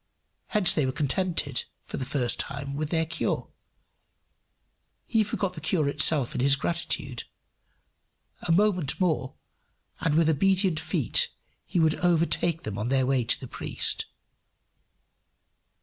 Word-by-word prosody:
Hence 210 -5 +3
they 150 -4 +1
were - - 0
contented, 150 -2 -1 0.2
for - - -7
the 130 -2 0
time, 140 0 -3
with 150 +1 -2
their 165 -1 +1
cure: 165 +1 -2 1.6
he 225 -2 +2
forgot 200 -2 -2
the 160 - -9
cure 155 -1 0
itself 140 -2 +2
in - - -2
his 140 +1 +4
gratitude. 140 -5 -2 1.2
A 175 - -2
moment 180 -5 +2
more, 155 -8 0 0.6
and 150 -2 0
with 165 0 +4
obedient 185 +2 +2
feet 480 - +1 0.4
he 180 - 0
would 160 -1 +4
overtake 170 -1 +1
them 105 -2 -5
on 105 - -2
their 130 0 +2
way 130 -1 +2
to 115 - +1
the 130 - -8
priest. - - -2
155 Hz, 135 wpm, -27 LUFS, 135-175 Hz, 1.6 s, his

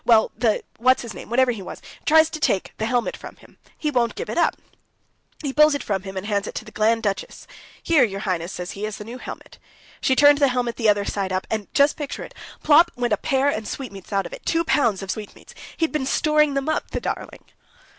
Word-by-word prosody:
Well, 225 -2 +4
the... 225 -4 +1 0.2
what's 255 +2 +3
his 230 -3 -7
name, - - -10
whatever 255 +1 +3
he 225 -4 -6
was... 185 - -8 0.3
tries 320 +1 +6
to 315 - -5
take 195 -10 0
the 220 - 0
helmet 245 0 0
from - - -10
him... - - -21 0.2
he 300 - -1
won't 240 -3 +1
give 465 - -5
it - - -4
up!... - - +3 0.9
He 275 -2 -2
pulls 300 0 +5
it 285 - -3
from 195 -3 -1
him, 190 0 -8
and 190 - -4
hands 205 -1 -1
it - - -7
to - - -5
the 215 - -12
Grand 225 +2 +1
Duchess. 200 -2 -3 0.4
'Here, 325 -4 +4
your 195 -3 -2
Highness,' 180 -3 -2
says 180 0 -5
he, 200 - -7
'is 215 - -6
the - - -7
new 235 +4 -8
helmet.' - - -10 0.4
She 260 - +2
turned 290 +1 +6
the 280 - +5
helmet 245 -2 -1
the 225 -3 +3
other 205 -1 +2
side 195 -2 -2
up, 185 0 -1
And—just 220 +7 +2
picture 295 -2 -5
it!—plop 325 +3 +2
went 240 -2 0
a - - +2
pear 270 +5 +1
and 220 -6 -3
sweetmeats 200 -9 -7
out 195 -1 0
of - - -8
it, - - -9
two 330 0 +1
pounds 235 - +1
of 190 - -3
sweetmeats!... 210 -2 -9 0.2
He'd 325 -1 0
been 295 -4 -1
storing 300 0 +2
them 275 +1 -1
up, 315 - -1
the - - -3
darling!" - - -5
240 Hz, 235 wpm, -23 LUFS, 205-285 Hz, 0.9 s, tries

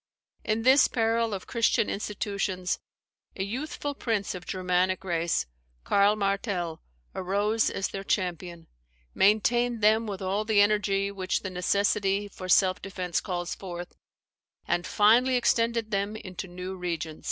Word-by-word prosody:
In 220 +1 -1
this 265 +3 +6
peril 230 -1 +1
of 195 -2 -5
Christian 230 -2 +2
institutions, 200 -3 -2 0.6
a 190 - -2
youthful 285 +7 -4
prince 225 -7 -2
of 180 -1 -9
Germanic 185 0 0
race, 170 - 0 0.4
Karl 200 +1 +4
Martell, 195 -5 -2 0.3
arose 205 +4 +1
as 195 - -2
their 195 - -6
champion; 175 -3 -2 0.5
maintained 235 +3 +2
them 220 +2 +4
with 200 -2 -4
all 195 +2 -1
the 215 -1 +2
energy 205 -1 +2
which 185 -2 -2
the 190 - -4
necessity 200 +2 +1
for 185 -2 -9
self 185 +1 +4
defence 185 -3 -3
calls 175 -2 -3
forth, 175 -2 -7 0.7
and 175 +1 0
finally 240 +5 +4
extended 230 -2 +1
them 200 +1 -1
into 190 -3 -7
new 180 +1 -6
regions." 165 -3 -4
195 Hz, 135 wpm, -27 LUFS, 185-215 Hz, 0.7 s, this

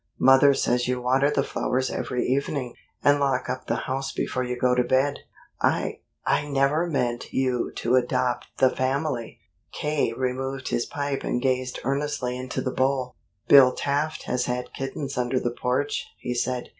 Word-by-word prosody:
Mother 135 +1 +6
says 120 -1 +1
you 125 0 0
water 130 +3 +2
the 140 -2 +1
flowers 130 0 -1
every 125 - -2
evening, 135 -1 -1 0.3
and 145 0 +5
lock 135 -2 +1
up 125 0 -6
the - - -1
house 135 +1 -2
before 130 - -2
you 125 0 -3
go 125 0 +2
to 125 0 +3
bed. 135 +3 +1 0.4
I - - +1 0.3
I 150 - +1
never 140 +4 +2
meant 125 -6 -2
you 130 -2 0
to 120 +2 +1
adopt 125 0 0
the 130 -1 +4
family!" 130 -2 -2 0.3
K. 150 -5 0
removed 130 +2 -3
his 120 - -1
pipe 140 -1 -3
and - - 0
gazed 130 0 -1
earnestly 135 -2 -1
into 130 0 -4
the 130 - -1
bowl. 130 -1 0 0.3
"Bill 130 -2 +8
Taft 145 +2 -1
has 125 - -1
had 125 0 -3
kittens 135 0 -4
under 125 +1 +1
the 120 - -1
porch," 130 +4 -1
he 125 - -4
said. 125 0 -2
130 Hz, 170 wpm, -25 LUFS, 125-140 Hz, 0.4 s, Bill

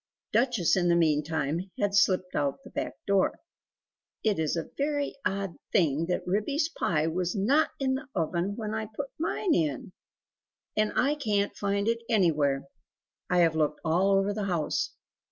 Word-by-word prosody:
Duchess 230 -6 +3
in 180 -2 +2
the 170 - +4
meantime, 160 +1 +1
had 205 -1 +1
slipped 185 -2 +3
out 140 -1 +1
at 275 - -28
the - - -11
back - - -3
door. 200 -1 +2 0.9
"It 210 -5 +1
is 155 0 0
a 165 - -4
very 285 0 -1
odd 195 -2 -2
thing 165 -4 +2
that 180 - -1
Ribby's 275 - 0
pie 155 - 0
was 175 +4 -1
NOT 265 +11 +3
in 265 -1 +1
the 275 +3 -4
oven 175 +3 -1
when 215 -1 -4
I 220 0 -2
put 270 +6 -6
mine 335 +2 0
in! 155 +3 -1 0.8
And 215 0 +2
I 275 +3 +3
can 210 -9 0
t - - -29
find 200 +1 -1
it 230 0 +1
anywhere; 150 - +2 0.6
I 180 -1 +4
have 165 -2 +3
looked 155 -1 +1
all 175 +5 +3
over 195 +1 +1
the 210 -1 -2
house. 175 -5 0
195 Hz, 170 wpm, -28 LUFS, 165-220 Hz, 0.9 s, the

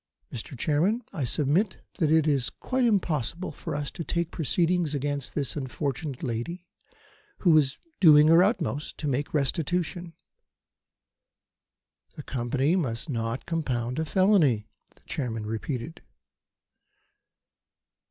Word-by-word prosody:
Mr. 125 +2 -7
Chairman, 175 - +1
I 145 - -2
submit 150 - +1 0.2
that 160 -4 +2
it 160 -1 +4
is 135 -6 +1
quite 255 - -1
impossible 175 - 0
for 145 - -6
us 145 -1 -3
to 170 - -5
take 170 +1 -2
proceedings 170 0 +1
against 145 -1 -3
this 135 -8 -1
unfortunate 140 +1 -4
lady, 135 +9 -4 0.8
who 170 -4 +5
is 140 -3 +3 0.2
doing 150 -4 +8
her 165 +2 +7
utmost 180 - -1
to 150 - -3
make 140 +1 -1
restitution." 165 +4 -1 2.0
"The 150 - -8
Company 135 +6 0
must 140 -4 -2
not 115 +1 -3
compound 130 -6 -2
a 160 - 0
felony," 160 - +3 0.3
the - - -26
Chairman 115 -6 -3
repeated. 120 +7 -4
150 Hz, 120 wpm, -27 LUFS, 130-170 Hz, 2.0 s, doing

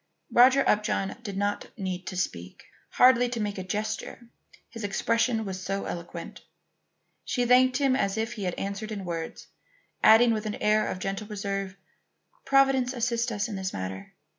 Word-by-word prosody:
Roger 260 +3 +6
Upjohn 210 -2 +1
did 200 -5 -6
not 205 0 -1
need 185 -3 -4
to 185 - -5
speak, 90 - -4 0.3
hardly 245 -1 +5
to 240 -1 -4
make 205 -2 -3
a - - -4
gesture; 215 +4 -4 0.4
his 230 - -9
expression 230 +2 0
was 190 -1 -5
so 195 +1 -3
eloquent. 170 0 -7 0.8
She 245 -1 -1
thanked 255 +1 +5
him 275 -2 +2
as 200 -5 0
if 225 +1 -2
he 205 -4 -5
had 180 - -2
answered 200 +2 -4
in 200 -3 -5
words, 165 -2 -5 0.6
adding 230 +2 +7
with 215 0 -3
an 210 - -3
air 215 0 +2
of - - -3
gentle 195 +3 -4
reserve: 195 -2 -4 0.7
"Providence 270 -2 +3
assists 235 -1 -1
us 205 0 -1
in 215 - -5
this 190 0 -4
matter. 95 +1 -6
210 Hz, 165 wpm, -27 LUFS, 195-240 Hz, 0.8 s, adding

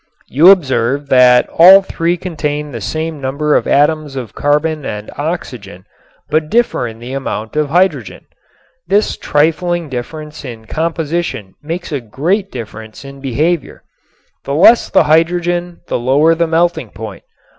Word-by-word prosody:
You 160 +8 +5
observe 140 -6 +2
that 125 -2 +5
all 190 +3 +9
three 170 -1 -1
contain 150 -4 -4
the 115 -4 -7
same 155 +5 -4
number 140 +3 0
of - - +1
atoms 150 0 +1
of 125 -6 -6
carbon 150 +1 0
and 105 -4 -6
oxygen 125 - -6 0.4
but 155 +1 0
differ 235 - +1
in 110 -1 -9
the 120 +3 -8
amount 115 -4 -5
of 150 -1 0
hydrogen. 160 - 0 0.6
This 200 +4 +1
trifling 165 +2 0
difference 150 +5 -7
in 115 -4 -9
composition 160 - -3
makes 165 +4 -6
a 145 -3 -2
great 175 - -2
difference 110 0 -9
in 140 0 -11
behavior. 150 +5 -2 0.6
The 140 - -3
less 225 +9 +5
the - - +4
hydrogen 175 +2 0
the - - -2
lower 140 +7 +3
the 170 0 0
melting 165 -6 0
point. 105 -4 -9
150 Hz, 145 wpm, -15 LUFS, 125-170 Hz, 0.6 s, all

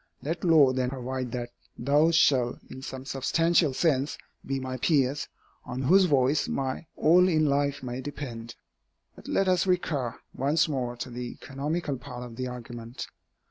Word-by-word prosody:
Let 165 +4 -3
law 155 -7 +6
then 130 -1 0
provide 130 -1 -4
that 120 -1 -4 0.3
those 150 +6 +3
shall, 125 -6 +3
in 130 - -8
some 130 0 -7
substantial 160 +4 +2
sense, 140 0 +1 0.3
be 135 0 -2
my 130 0 -4
peers, 140 0 +1 0.4
on 125 +1 -4
whose 185 +8 +6
voice 140 -2 +2
my 135 +4 -3
all 180 +4 +5
in 155 -3 +3
life 140 -1 +1
may 125 +1 -4
depend. 125 -5 -7 0.6
But - - -13
let 195 - +1
us 185 0 +2
recur 150 -9 0 0.2
once 145 +6 +2
more 125 -5 -2
to 120 +1 -6
the 120 0 -6
economical 145 +1 -3
part 125 -1 -8
of 120 -2 -10
the 130 +1 -3
argument. 120 -1 -7
135 Hz, 160 wpm, -27 LUFS, 125-155 Hz, 0.6 s, law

